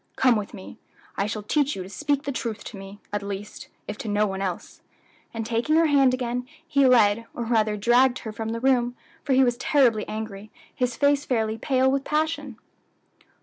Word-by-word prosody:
Come 255 -2 +4
with 210 -2 -3
me. 190 - -11 0.4
I 200 - 0
shall 215 -1 -4
teach 290 +6 +1
you 190 - -5
to 185 - -10
speak 285 +7 -1
the 280 - -3
truth 230 -5 -4
to - - -8
me 195 +1 -10 0.2
at 205 - -1
least, 200 +1 -7 0.2
if 210 - -6
to - - -6
no 210 0 +2
one 195 -1 -3
else," 185 -3 -5 0.5
and 225 -1 -4
taking 235 +7 0
her 330 +1 +5
hand 280 -4 +4
again, 250 -1 -2 0.2
he 280 -4 +4
led, 230 -2 +4
or 240 - -3
rather 220 -2 +1
dragged, 245 +4 +4
her 220 - -4
from 220 +1 -5
the 230 +1 -3
room, 245 -1 +2 0.3
for 275 - 0
he 265 +1 +5
was 245 -1 +1
terribly 245 -5 +2
angry, 215 -1 -6 0.2
his 250 -3 -1
face 285 0 +2
fairly 220 -3 -1
pale 265 -1 +2
with 275 0 0
passion. 300 -5 -2
235 Hz, 200 wpm, -25 LUFS, 210-265 Hz, 0.5 s, her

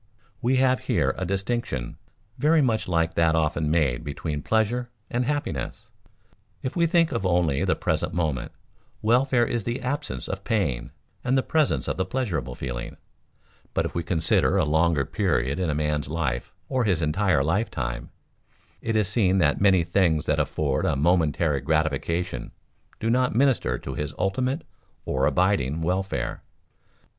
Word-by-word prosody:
We 130 +1 +2
have 130 0 +3
here - - +2
a 95 - -3
distinction 95 - -2 0.4
very 155 +3 +4
much 115 -4 0
like 80 -2 +1
that 80 -1 +3
often 80 -1 +1
made 75 -7 +1
between 75 +1 -4
pleasure 115 +5 0 0.2
and 125 +1 0
happiness. 140 - -3 0.7
If 130 - -3
we 170 -1 +3
think 165 -1 +3
of 115 - -2
only 85 -6 +2
the - - +2
present - - -1
moment, 80 -7 -1 0.5
welfare 120 +2 +3
is 120 -1 -2
the 120 +4 -2
absence 145 +4 -3
of 95 0 -5
pain, 75 - -1 0.3
and 130 +2 +2
the 130 - +2
presence 155 -3 +1
of - - -2
the 95 - 0
pleasureable 85 - -2
feeling; - - -5 0.8
but - - +1
if - - -4
we 85 - -1
consider 85 -1 +2
a - - +3
longer 80 -1 +2
period 80 - 0
in 90 -3 0
a 75 - 0
man's 75 -2 -1
life 75 -6 -2 0.2
or 130 -2 0
his 90 -7 +1
entire 80 -1 +2
lifetime, 65 - -2 0.7
it 115 - -1
is 105 -3 +2
seen 100 -3 +2
that 75 -3 +2
many 95 -3 +5
things 85 -3 +2
that - - +1
afford 70 -4 0
a - - +1
momentary 80 -1 +2
gratification 80 -1 -1 0.5
do 110 - -2
not 125 -1 +2
minister 135 0 +2
to 65 - -6
his 75 +4 -4
ultimate, 130 - 0 0.4
or - - +1
abiding, 80 -5 +1
welfare. 95 +3 -2
90 Hz, 155 wpm, -25 LUFS, 75-120 Hz, 0.8 s, many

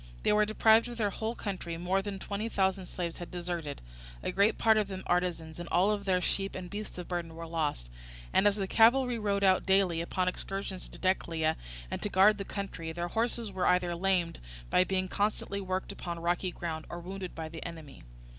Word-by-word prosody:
They - - +4
were 210 0 +4
deprived 220 +2 +5
of 240 -1 -7
their 210 -3 +1
whole 220 +4 -3
country: 185 -6 -4
more 180 +3 +1
than 200 0 -4
twenty 205 +3 -3
thousand 190 -2 +1
slaves 175 -2 -4
had 175 - -6
deserted, 170 - -4 0.4
a - - -1
great 205 +3 +3
part 220 -1 +5
of 210 -2 +2
them 190 -1 -6
artisans, 175 -3 -1
and 175 - -6
all 195 +4 +4
their 195 -3 +1
sheep 195 +2 -1
and 180 -1 -6
beasts 210 -1 -6
of 180 - -6
burden 170 -2 -3
were 165 0 -6
lost; 155 - -2 0.5
and 205 - +5
as 205 - +3
the 200 -2 -1
cavalry 240 +4 +4
rode 200 -2 0
out 190 -1 +5
daily 190 -4 +3
upon 180 +2 -1
excursions 195 0 -3
to - - -11
Decelea 165 -4 +1 0.4
and - - -3
to 205 - -2
guard 205 +2 +5
the 195 - -3
country, 190 -6 -5
their 175 +1 -3
horses 230 +1 -1
were 190 -1 0
either 180 -1 +3
lamed 180 -1 +1 0.3
by - - +5
being 185 0 -1
constantly 200 0 -1
worked 185 0 -2
upon 170 -1 -5
rocky 175 +2 0
ground, 165 -3 -5
or 175 - -5
wounded 185 +1 -6
by 160 -1 -4
the 160 0 -8
enemy. 160 -4 -9
185 Hz, 205 wpm, -31 LUFS, 170-200 Hz, 0.5 s, deprived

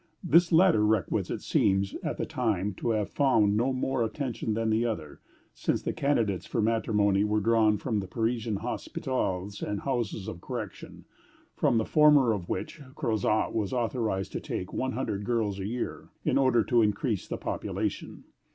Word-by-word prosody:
This 170 0 +4
latter 165 - +5
requisite 105 -5 0
seems, 95 -1 +1
at - - -3
the - - -2
time, 105 -5 -1
to - - -2
have 105 -3 0
found 110 -8 +3
no 120 +5 +2
more 130 -1 0
attention 115 -2 -3
than 115 0 0
the 110 +2 +2
other, 80 -11 -4 0.3
since - - -1
the - - -2
candidates 110 - 0
for - - -2
matrimony 105 -3 +2
were 105 0 +1
drawn 110 0 +3
from 110 0 -1
the 95 - -5
Parisian 115 +2 -1
hospitals 100 -3 -3
and 105 -1 -3
houses 120 -7 -2
of 85 - -6
correction, 110 -3 -7 0.5
from 115 - +2
the 110 - +1
former 150 -6 +5
of 90 -4 -5
which 160 - -4
Crozat 110 -6 0
was 105 -1 -1
authorized 115 -5 -1
to - - -3
take 90 - -5
one 130 0 -1
hundred 105 -5 -2
girls 105 -3 -1
a 95 - -3
year, 120 +3 -4 0.2
"in - - +2
order 130 -4 +4
to 120 +1 +3
increase 110 - 0
the - - -4
population." - - -4
110 Hz, 170 wpm, -28 LUFS, 100-125 Hz, 0.5 s, latter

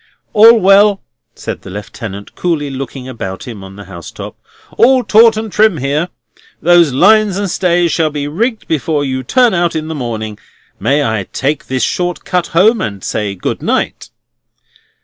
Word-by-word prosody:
"All 225 +2 +7
well!" 195 +1 +4 0.3
said - - -6
the - - -11
Lieutenant, 100 +1 -8
coolly 155 -5 -2
looking 135 -1 -7
about 100 -6 -6
him 110 -5 -8
on 95 0 -11
the 105 - -10
housetop. 85 -4 -9 0.4
"All 255 +2 +4
taut 220 +1 +5
and 220 -1 -4
trim 215 -4 +3
here. 145 +6 -1 0.5
Those 170 -3 +4
lines 205 +7 +4
and 200 -3 -2
stays 175 -2 +1
shall 160 -2 +1
be 145 -1 -4
rigged 220 - -2
before 155 -1 -1
you 130 -1 -2
turn 245 - +2
out 175 -2 0
in 155 0 -3
the - - -3
morning. 110 -6 -5 0.4
May 145 +2 +1
I 110 -5 -2
take 145 +2 -2
this 130 -3 -1
short 175 +5 -2
cut 180 -1 -1
home, 210 +6 +3
and 100 -3 -5
say 105 -2 -3
good 90 - -4
night?" - - -2
155 Hz, 170 wpm, -14 LUFS, 120-195 Hz, 0.5 s, All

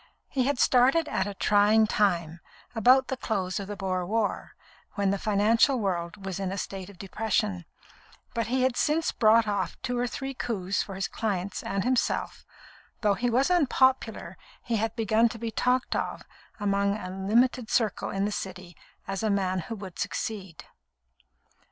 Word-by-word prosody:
He 260 -2 0
had 285 0 +1
started 260 +7 +4
at 190 - -1
a 200 - -5
trying 210 +2 +4
time, 175 -6 0 0.3
about 255 +4 +5
the 265 - -2
close 195 -5 -2
of 200 - -6
the 205 - -5
Boer 185 -2 -2
war, 210 +3 -2 0.4
when 200 -1 +1
the 200 - -1
financial 220 +6 +3
world 185 -1 -3
was 190 -1 -4
in 190 -1 -2
a 195 - -4
state 195 -1 -5
of 200 - -14
depression; 195 -2 -1 0.7
but 230 -2 -1
he 255 +2 +1
had 260 -1 +2
since 315 +4 +1
brought 220 0 +4
off 200 -2 -2
two 245 -1 -1
or 245 - 0
three 270 +2 -5
coups 200 -6 -2
for 195 - -6
his 195 0 -2
clients 200 -3 -3
and 195 -1 -2
himself, 250 +1 -1 0.5
and - - -42
though 210 -3 +3
he 245 +5 -1
was 260 +8 +2
unpopular, 265 -6 +1 0.2
he 230 -2 -1
had 225 +1 -1
begun 225 +1 +3
to 230 - -8
be 230 0 -4
talked 250 +3 +1
of - - -3 0.4
among 200 0 +1
a 185 -3 -6
limited 225 +5 +1
circle 225 -4 0
in 195 +1 -1
the 210 - -1
City 185 -3 -6 0.3
as 195 0 -3
a 220 - 0
man 190 -2 0
who 205 +7 -5
would 195 -4 -9
succeed. 190 -6 -4
210 Hz, 175 wpm, -27 LUFS, 195-240 Hz, 0.7 s, about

